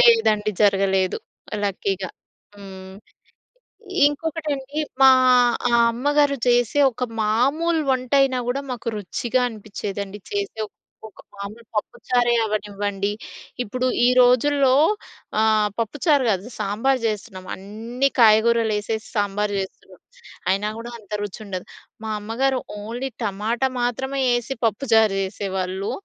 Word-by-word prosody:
లేదండి. 450 - +4
జరగలేదు 195 -2 +2 0.5
లక్కీగా. 195 -1 -2 0.5
హ్మ్. 190 -1 -11 1.1
ఇంకొకటండి, 295 -2 -3 0.2
మా 265 - +9 0.8
అమ్మగారు 285 +3 +2
చేసే 245 +2 +3
ఒక 250 - -8 0.2
మామూలు 280 +10 +2
వంటయినా 260 +1 +2
గూడా 275 +3 -1
మాకు 240 -2 -4
రుచిగా 230 +5 -1
అనిపిచ్చేదండి. 205 -2 -6
చేసేవ్ 395 - -3 0.4
ఒక 210 - -17 0.2
మామూలు 205 +4 -8
పప్పుచారే 240 +3 0
అవ్వనివ్వండి. 205 -1 -2 0.5
ఇప్పుడు 250 +3 -2 0.2
ఈ - - +5
రోజుల్లో 260 +2 +4 0.7
ఆహ్, 215 -1 +3
పప్పుచారు 280 +5 +1
గాదు. 195 +1 -1
సాంబారు 220 +6 0
జేస్తున్నాం. 200 -3 -4
అన్నీ 225 +7 -2
కాయగూరలేసేసి 220 -1 +3
సాంబారు 205 0 0
జేస్తున్నాం. 190 - -9 0.5
అయినా 200 +2 +1
గూడా 235 +1 -7
అంత 210 -1 -17
రుచుండదు. 200 -2 -6 0.4
మా 220 - -3
అమ్మగారు 255 +5 0 0.2
ఓన్లీ 235 +5 -4 0.2
టమాటా 220 +6 0
మాత్రమే 265 +3 -1
యేసి 240 +2 0
పప్పుచారు 220 -2 +3
జేసేవాళ్ళు. 190 0 -3
220 Hz, 100 wpm, -22 LUFS, 205-260 Hz, 1.1 s, మా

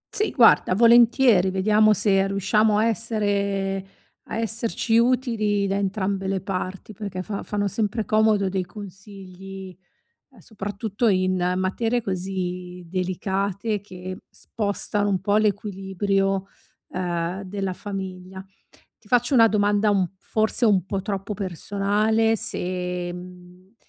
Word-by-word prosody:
Sì, 425 - +2
guarda, 185 - +5
volentieri. 235 -3 +5
Vediamo 210 +3 +3
se 195 -1 +3
riusciamo 205 +2 +2
a 220 - +3
essere 200 -4 -1 0.4
a - - -4
esserci 230 0 0
utili 230 -5 +1
da 195 - -1
entrambe 195 -1 -1
le 195 0 0
parti, 190 +2 -5
perché 190 -2 -5
fa 200 0 -5
fanno 205 -1 -2
sempre 215 +2 -1
comodo 215 -3 +3
dei 190 0 -1
consigli, 195 -1 -10 0.5
ehm, - - -20
soprattutto 205 +1 -3
in 185 -2 +1
materie 225 +6 0
così 180 -2 -4
delicate 195 +3 -2
che 185 -2 -8
spostano 205 -1 -1
un 190 -3 0
po' 205 +2 +2
l'equilibrio, 195 -2 0 0.4
ehm, 180 +1 -3
della 195 0 -3
famiglia. 190 -1 -7 0.5
Ti 210 - -22
faccio 245 +3 +2
una 230 -3 +7
domanda 205 0 +2 0.3
forse 220 +4 +1
un 195 -4 +3
po' 195 0 -3
troppo 195 +1 -4
personale 205 +4 0
se, 180 -4 -2
mhmm, 180 +2 -13
195 Hz, 120 wpm, -23 LUFS, 185-215 Hz, 0.5 s, una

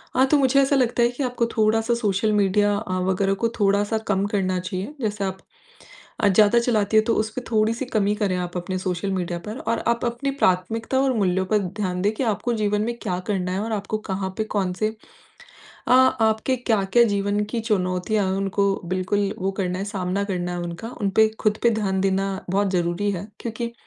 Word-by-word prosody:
हाँ, 260 +1 +5
तो 295 +2 +4
मुझे 275 0 +4
ऐसा 275 +1 +2
लगता 245 -2 +2
है 235 - +4
कि 245 +3 -4
आपको 245 -2 0
थोड़ा-सा 225 +2 +2
सोशल 215 -2 0
मीडिया 205 0 +3
अ, 185 -3 -3
वग़ैरह 190 +1 +1
को 230 - +3
थोड़ा-सा 205 +2 +2
कम 200 -1 +1
करना 185 -3 0
चाहिए, 185 +7 -5
जैसे 210 -3 -2
आप 190 -1 -2 0.8
अ, - - +3
ज़्यादा 210 +4 +5
चलाती 220 -3 +1
है, 215 - +6
तो 230 - +1
उसपे 220 +3 -2
थोड़ी-सी 225 +3 +1
कमी 210 -4 +1
करें 205 -4 0
आप 180 0 -4
अपने 180 +1 -3
सोशल 185 +1 -2
मीडिया 175 -2 -2
पर 215 +3 -5
और 230 - +1
आप 235 +1 +1
अपनी 240 +4 -2
प्राथमिकता 225 +2 0
और 270 -1 +2
मूल्यों 190 -2 +1
पे 210 +3 +2
ध्यान 185 -1 -3
दें 205 +2 +2
कि 245 - -2
आपको 235 +1 0
जीवन 210 -2 0
में 235 +2 -2
क्या 180 0 -2
करना 185 -3 -1
है? 185 - -1
और 220 +2 -3
आपको 210 +1 -2
कहाँ 190 -1 -2
पे 220 - +1
कौन-से 200 -1 -1 1.0
अ, - - +4
आपके 255 -1 +3
क्या-क्या 225 -2 +2
जीवन 205 -1 0
की 235 - -1
चुनौतियाँ 200 -1 0
हैं? 190 - -1
उनको 195 0 0
बिल्कुल 185 +3 0
वो 190 +1 -1
करना 180 -1 -1
है, 195 - -2
सामना 200 -1 -2
करना 180 -3 -3
है 175 - -3
उनका, 175 +6 -6
उनपे 215 +2 +3
खुद 215 0 +1
पे 235 - +5
ध्यान 200 -4 0
देना 195 0 +2 0.4
बहुत 200 +1 +1
ज़रूरी 180 +2 0
है 190 0 -4
क्योंकि 235 0 -4
205 Hz, 200 wpm, -23 LUFS, 190-225 Hz, 1.0 s, है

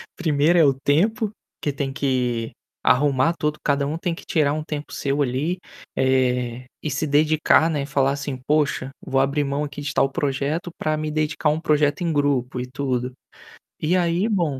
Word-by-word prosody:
primeiro 160 +1 +3
é 160 - +6
o 135 - +4
tempo, 200 - +1 0.3
que 145 - 0
tem 135 0 -3
que 125 -4 -1 0.3
arrumar 135 +5 +3
todo 150 0 -1
cada 140 -1 +2
um 155 +2 -2
tem 170 0 -2
que 180 - -10
tirar 150 -4 +2
um 155 0 -3
tempo 150 -2 -6
seu 140 +1 -1
ali, 145 +8 -1 0.4
eh, 125 -2 +1 0.2
e 155 - -1
se 150 +3 -1
dedicar, 155 +2 +4
né, 145 -3 -1
e - - -4
falar 140 -1 +1
assim: 140 -1 -4
"Poxa, 145 -3 +1
vou 135 - 0
abrir 140 +2 +1
mão 140 +1 -1
aqui 145 0 -6
de 145 - -3
tal 135 - +3
projeto 145 +5 -2
para 155 0 0
me 155 0 -2
dedicar 150 0 0
a - - +4
um 155 - -2
projeto 150 0 +2
em 170 -2 0
grupo 135 -4 0
e 125 - -4
tudo". 130 -2 -2 0.7
E 170 +4 +2
aí 175 +4 +1
bom, 170 -10 0
145 Hz, 195 wpm, -23 LUFS, 135-155 Hz, 0.7 s, é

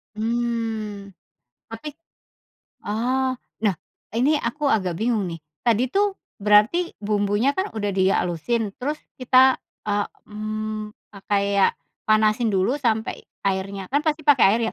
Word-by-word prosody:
Mmm, 225 -3 -2 0.6
tapi 225 +7 -6 1.0
oh, 255 +4 0 0.3
lah 200 -4 +3 0.4
ini 270 +6 +3
aku 270 +6 -3
agak 185 -5 -2
bingung 220 -4 0
nih. 165 - -5 0.3
Tadi 235 0 +3
tuh 400 0 +2 0.2
berarti 210 - +4
bumbunya 210 +5 +1
kan 380 +2 0
udah 205 -2 -1
di 190 0 +3
halusin, 200 +6 0
terus 295 +4 -2 0.2
kita, 260 +1 +6 0.3
eee, 205 0 +1 0.2
mmm, 215 0 -4 0.2
pakai 200 0 0 0.2
ya - - +7 0.4
panasin 215 +1 +3
dulu 195 +7 +2
sampai 230 -6 0 0.3
airnya 195 0 -2
kan 285 +2 +2
pasti 310 0 0
pakai 290 -4 +6
air - - -2
220 Hz, 125 wpm, -23 LUFS, 205-255 Hz, 1.0 s, ya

